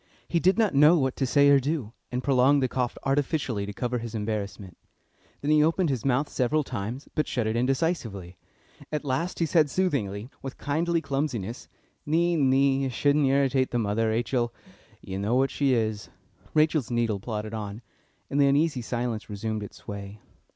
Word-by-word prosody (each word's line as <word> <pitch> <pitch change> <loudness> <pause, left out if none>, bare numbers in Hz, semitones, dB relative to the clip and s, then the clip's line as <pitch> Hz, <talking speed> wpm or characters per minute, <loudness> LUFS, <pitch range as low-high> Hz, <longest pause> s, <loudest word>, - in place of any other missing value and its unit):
He 170 - +1
did 185 +5 +3
not 220 -6 +2
know 150 +5 +6
what 130 -3 0
to 135 - 0
say 140 +2 +4
or 140 -1 +6
do, 135 -5 -3 0.2
and 125 +1 -2
prolonged 135 +1 +4
the - - +3
cough 125 -1 -2
artificially 135 -6 0
to - - -4
cover 125 +4 -2
his 115 -1 -6
embarrassment. 105 -3 -4 0.7
Then 145 - 0
he 150 0 +5
opened 165 0 +2
his 125 -5 -2
mouth 135 +2 +1
several 145 +3 0
times, 120 +1 -5
but 155 - 0
shut 120 -3 -1
it 110 +1 -1
indecisively. 120 - -1 0.6
At 150 -1 -3
last 160 +7 -1
he 165 - +1
said 155 -1 +3
soothingly, 125 - -1
with 135 -1 -7
kindly 165 +4 0
clumsiness: 135 -7 -3 0.4
"Nee, 170 +3 +2
nee; 135 -1 +3
you 135 - 0
shouldn't 140 +5 +2
irritate 135 -1 +2
the 120 - -1
mother, 110 0 0
Rachel. 120 +1 0 0.5
You 95 0 -5
know 105 +5 0
what 135 +1 +2
she 135 -3 +2
is." 110 -2 -2 0.5
Rachel's 155 -4 +2
needle 115 -4 0
plodded 105 0 -5
on, 105 +1 -6 0.4
and 145 - +1
the 140 - +5
uneasy 145 -1 +2
silence 120 -2 -3
resumed 110 +1 -3
its 105 - -9
sway. 100 +1 -7
130 Hz, 180 wpm, -26 LUFS, 110-145 Hz, 0.7 s, know